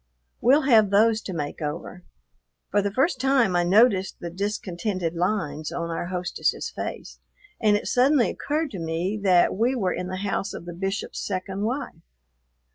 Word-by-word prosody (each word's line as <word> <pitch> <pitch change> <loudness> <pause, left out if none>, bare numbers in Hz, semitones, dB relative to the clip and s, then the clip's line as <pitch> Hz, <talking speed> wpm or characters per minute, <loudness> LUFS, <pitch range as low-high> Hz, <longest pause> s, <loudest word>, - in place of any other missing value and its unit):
We'll 275 +5 +5
have 225 -6 +5
those 220 +2 +4
to 195 - -6
make 150 -2 -4
over." 150 +4 -5 0.7
For 205 - +3
the 200 0 -1
first 265 - +1
time 260 -8 +3
I 175 - +3
noticed 195 +1 +3
the 170 - -6
discontented 185 -2 -3
lines 165 -4 -2
on 170 0 -3
our 165 - -3
hostess's 180 0 -2
face, - - -6 0.4
and 210 -2 +4
it - - -7
suddenly 255 0 +3
occurred 300 0 -2
to 190 - -6
me 165 +5 -2
that 185 -3 +4
we 235 +6 +1
were 195 -7 0
in 180 - -4
the 185 0 -4
house 195 +1 -2
of - - -8
the 175 - -7
Bishop's 195 +4 -3
second 190 0 -3
wife. 245 - -4
195 Hz, 170 wpm, -25 LUFS, 175-230 Hz, 0.7 s, We'll